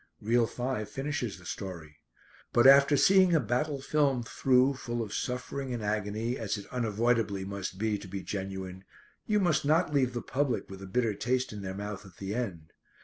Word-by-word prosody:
Reel 115 +2 +2
five 120 -4 -3
finishes 135 -4 -3
the 90 - -16
story. 85 -5 -7 0.6
But 120 - +5
after 140 +2 +7
seeing 185 +1 +5
a - - +5
battle 135 +5 -1
film 140 -3 +1
through 130 +3 +3
full 120 -3 -3
of 105 - -7
suffering 125 +1 -3
and 115 - -5
agony, 105 +3 -1
as 105 -1 -2
it 100 - -8
unavoidably 115 -4 0
must 100 -1 -5
be 105 0 0
to 95 - -10
be 95 +1 -5
genuine, 95 -1 -5 0.4
you 210 -1 +3
must 160 -5 +2
not 155 +2 +2
leave 130 -3 +2
the 120 - -4
public 135 -6 -1
with 95 0 -9
a 95 - -7
bitter 115 +2 +1
taste 125 +4 -1
in 105 - -6
their 95 -1 -5
mouth 105 0 -5
at 95 -4 -16
the 100 +1 -4
end. 90 -10 -4
115 Hz, 190 wpm, -30 LUFS, 100-130 Hz, 0.6 s, after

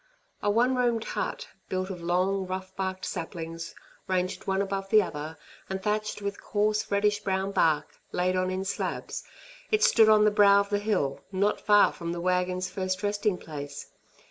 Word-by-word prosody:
A 205 - +1
one 240 +5 +3
roomed 240 -3 +1
hut, - - -3 0.2
built 185 +1 -2
of 180 -2 -7
long, 185 +3 0
rough 185 0 -5
barked 190 -1 -3
saplings, 165 0 -5 0.3
ranged 185 -1 -1
one 190 0 +1
above 195 0 -2
the 215 0 +6
other, 155 -1 -6 0.3
and 190 0 -2
thatched 210 +1 -2
with 200 0 -4
coarse 210 0 0
reddish 205 +1 +2
brown 195 -1 -1
bark, 155 -5 +1
laid 185 +1 +1
on 185 0 +1
in 185 +1 -2
slabs, 200 - -3 0.5
it 430 +1 +2
stood 225 - +6
on 215 -1 +6
the 210 - +5
brow 200 -1 +6
of 200 0 -1
the 205 - +2
hill 195 -10 0
not 200 +2 +1
far 205 -1 +5
from 170 -1 -4
the 175 - -4
wagon's 180 +1 0
first 185 0 -3
resting 205 -1 0
place. 145 -4 -8
190 Hz, 175 wpm, -28 LUFS, 180-205 Hz, 0.5 s, the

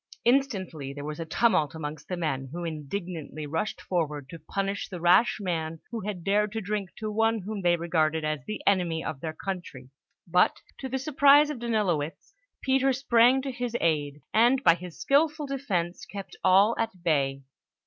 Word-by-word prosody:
Instantly 195 - 0
there 145 0 -7
was 150 +1 -5
a 165 - -4
tumult 165 - +2
amongst 150 -1 -6
the 180 - -3
men, 135 -6 -2
who 175 +2 -5
indignantly 160 -1 -5
rushed 165 +8 -2
forward 150 -6 -2
to 165 - -9
punish 195 +5 -3
the 180 -3 -6
rash 180 +7 +4
man 165 -4 -3
who 235 - -3
had 200 -4 -5
dared 205 +2 +2
to 225 - -2
drink 205 -2 -3
to 215 -1 -4
one 225 0 +1
whom 205 +1 -5
they 175 -1 +3
regarded 160 -2 0
as 155 -3 -2
the 215 - -5
enemy 175 -5 +1
of 140 - -4
their 160 - -3
country; 160 -9 -6 0.4
but, 180 +1 +3 0.2
to 265 - -5
the 265 - -1
surprise 285 +1 +5
of 280 - -6
Danilowitz, 205 - -1 0.3
Peter 270 0 +3
sprang 250 0 +4
to 275 - -3
his 245 -1 -3
aid, 145 -3 0
and 245 +4 +4
by 170 - +7
his 175 0 -9
skillful 300 +2 +2
defence, 220 -9 -3
kept 200 -1 -8
all 200 +5 +5
at 215 -6 -3
bay. 140 -4 +1
185 Hz, 180 wpm, -27 LUFS, 160-230 Hz, 0.4 s, by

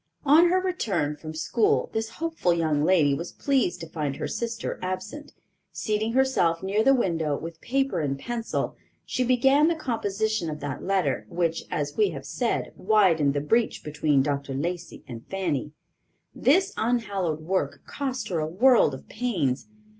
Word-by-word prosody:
On 320 +5 +6
her 370 +1 +3
return 205 - -1
from 155 +1 -8
school 185 +8 +1
this 220 0 -2
hopeful 325 - -1
young 155 -3 +1
lady 155 -5 +4
was 165 +5 -4
pleased 270 -10 0
to 165 - -6
find 150 -4 -3
her - - -3
sister 230 0 -4
absent. 185 +11 -5 0.4
Seating 215 +1 -1
herself 240 -11 +2
near 200 +3 +1
the 270 +3 +5
window, 165 - 0
with 165 0 -8
paper 270 -7 0
and 140 -3 -1
pencil, 230 - -3 0.3
she 255 - -1
began 270 +4 +4
the 335 - +2
composition 220 - -1
of 150 -1 -5
that 145 -2 -5
letter, 145 - 0
which, 170 -1 -1
as 145 0 -3
we 210 -2 +4
have 140 -5 -7
said, 240 -2 -2
widened 180 -9 +3
the 145 - +1
breach 225 +10 +1
between 150 -2 +1
Dr. 140 -1 -2
Lacey 170 +3 -4
and 115 -2 -8
Fanny. 165 -7 -2 0.6
This 380 +9 +3
unhallowed 200 -9 -1
work 185 +4 -2
cost 260 -5 -4
her 175 -4 -1
a 155 - -1
world 215 - +4
of 130 - -13
pains. 185 - -1
185 Hz, 160 wpm, -26 LUFS, 155-240 Hz, 0.6 s, On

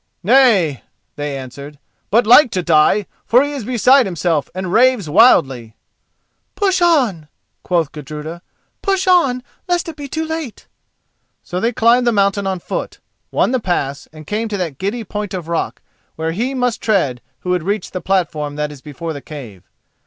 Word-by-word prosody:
"Nay," 205 - +4 0.3
they 145 -1 -4
answered, 140 +3 -9 0.3
"but 230 +3 +3
like 250 +4 +7
to 185 - -1
die, 165 +5 +3 0.2
for 250 +3 +4
he 290 - -3
is 275 -5 -5
beside 255 +1 +4
himself 170 -4 -1
and 185 -1 -4
raves 250 -6 +3
wildly." 135 - +3 0.8
"Push 380 -3 +1
on," 250 - +2 0.3
quoth 170 -4 0
Gudruda; 150 +3 -8 0.4
"push 385 -2 0
on, 280 -10 +3 0.2
lest 350 0 0
it 330 - -6
be 290 -1 -7
too 320 +3 -3
late." 320 -7 -6 0.8
So 180 - -4
they 230 +5 +1
climbed 240 +2 +3
the - - +5
mountain 200 -1 +1
on 190 -1 -1
foot, 175 - -5 0.3
won - - +1
the 260 - +1
pass 145 - -2
and 155 0 -12
came 215 +6 -2
to 210 -2 -3
that 165 -7 -4
giddy 210 +5 -2
point 205 -1 -5
of 175 -3 -6
rock 170 -1 -3 0.3
where 160 0 -2
he 240 +10 -2
must 250 -2 -1
tread 160 - 0 0.2
who 180 - -3
would 180 -1 +1
reach 200 +5 -3
the 185 - -5
platform 155 -6 -1
that 150 0 -3
is 145 -3 -12
before 155 +3 -6
the 145 - -8
cave. 115 - -10
190 Hz, 175 wpm, -18 LUFS, 155-245 Hz, 0.8 s, like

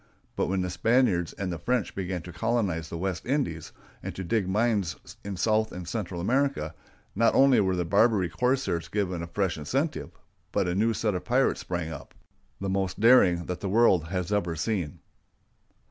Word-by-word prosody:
But - - 0
when 95 0 0
the 90 -1 -2
Spaniards 110 -6 +2
and 95 -3 -3
the 85 - -5
French 125 +2 -1
began 90 -3 -4
to 90 - -9
colonize 90 -5 -1
the 85 - -5
West 90 0 -3
Indies, 125 - -2 0.3
and - - -6
to 95 - -4
dig 95 +1 0
mines 105 -5 +1 0.3
in 100 -2 -5
South 110 +2 +1
and 90 -1 -7
Central 90 -2 -4
America, 125 - 0 0.4
not 115 +3 +3
only 135 -1 +6
were 95 -2 +2
the 90 -1 -1
Barbary 100 +1 +3
corsairs 85 - 0
given 95 -4 -2
a 85 - -5
fresh 90 -1 -1
incentive, 135 - -2 0.4
but - - +1
a 90 - 0
new 110 +4 +1
set 105 -2 0
of 90 - -3
pirates 125 +3 +2
sprang 85 -2 -3
up, 70 - -10 0.4
the 100 - -3
most 95 -1 -1
daring 95 -7 +5
that 90 - -4
the 100 - -3
world 95 -6 +4
has 90 +2 -2
ever 85 -5 0
seen. 85 -2 -2
95 Hz, 185 wpm, -27 LUFS, 85-115 Hz, 0.4 s, only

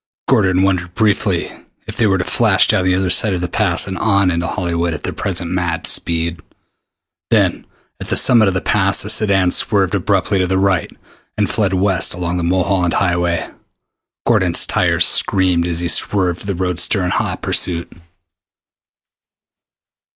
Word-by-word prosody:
Gordon 95 0 +2
wondered 90 -2 -1
briefly 105 -3 0 0.3
if - - -8
they 110 - +1
were 95 -1 +1
to 90 - -2
flash - - +2
down 90 - +1
the 90 -1 +2
other 95 -1 -1
side 100 -1 +3
of 90 - -4
the 90 - -2
Pass - - +1
and 95 -1 -6
on 100 -4 +2
into 85 -1 -2
Hollywood 85 -2 -2
at 75 - -10
their - - -4
present 85 -3 -3
mad 90 -2 -2
speed. 85 0 0 0.9
Then - - 0 0.3
at - - -8
the - - 0
summit 115 -4 +5
of 95 - -1
the 95 - -1
Pass 100 -1 +1
the 105 - +1
sedan 100 -4 +2
swerved 95 -3 +1
abruptly 100 0 0
to 90 - 0
the 95 +1 0
right 95 -4 0 0.5
and - - +1
fled 95 -3 0
west 95 -1 0
along 90 0 -3
the 85 - -3
Mulholland 90 0 0
Highway. 85 -2 -1 0.8
Gordon's - - +2
tires - - +1
screamed 90 -3 +2
as 85 -1 -2
he 85 - -2
swerved 90 0 0
the 100 - -2
roadster 90 +2 -1
in 90 - -2
hot - - -3
pursuit. 85 -1 -2
90 Hz, 165 wpm, -16 LUFS, 85-95 Hz, 0.9 s, summit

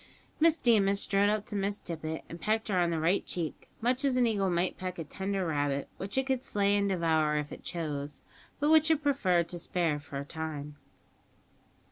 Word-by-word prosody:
Miss 325 0 +5
Deemas 200 -6 +3
strode 200 0 +2
up 210 0 0
to - - -7
Miss 200 +1 -1
Tippet, 160 -1 -5
and 170 - -9
pecked 220 +1 0
her 185 -3 +2
on 175 -1 +3
the 165 -1 -1
right 170 +5 +2
cheek, 165 -4 -5
much 250 +3 +1
as 275 -2 +2
an 250 -1 +4
eagle 200 -4 +1
might 175 +1 0
peck 185 -1 -5
a 165 - -3
tender 190 +4 -3
rabbit, 145 -3 -1
which 195 +5 -5
it 265 - +2
could 265 -2 0
slay 200 -3 +1
and 200 0 +2
devour 160 -4 +2
if 150 -1 -3
it - - -9
chose, 150 -4 -4 0.4
but 295 +1 +2
which 315 0 +6
it 310 -2 +2
preferred 185 - +2
to 175 - -4
spare 165 -4 0
for 145 -1 -8
a 140 - -4
time. 150 -2 -5
185 Hz, 205 wpm, -30 LUFS, 160-215 Hz, 0.4 s, which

